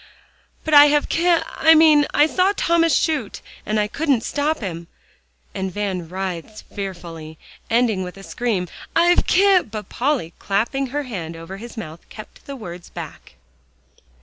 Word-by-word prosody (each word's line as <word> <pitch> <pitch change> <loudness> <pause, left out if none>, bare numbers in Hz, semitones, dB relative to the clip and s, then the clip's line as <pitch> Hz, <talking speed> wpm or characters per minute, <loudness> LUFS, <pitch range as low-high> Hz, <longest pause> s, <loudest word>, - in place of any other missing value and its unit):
"But 315 - -2
I 290 0 +10
have 295 0 +1
ki 340 +2 0
I 325 -1 +4
mean 310 -2 +6
I 295 - +5
saw 370 +5 +2
Thomas 330 -2 +2
shoot, 315 -2 -1 0.3
and 215 0 0
I 210 - +1
couldn't 275 -1 0
stop 300 +4 -1
him," 170 -5 -6 0.7
and 190 -1 -3
Van 185 -4 -3
writhed 190 +2 -5
fearfully, 170 -5 -7 0.3
ending 230 -4 +2
with 180 +1 -7
a 195 - -11
scream 205 -5 -2 0.3
"I've 345 +1 +4
ki" 385 0 +5
but 215 -4 -8
Polly, 250 - -1
clapping 235 +7 -1
her 290 +3 -3
hand 175 - -6
over 165 +4 -9
his 235 +3 -10
mouth, 165 -6 -9
kept 215 - -13
the 280 - -6
words 175 -8 -9
back. - - -10
225 Hz, 155 wpm, -21 LUFS, 185-300 Hz, 0.7 s, I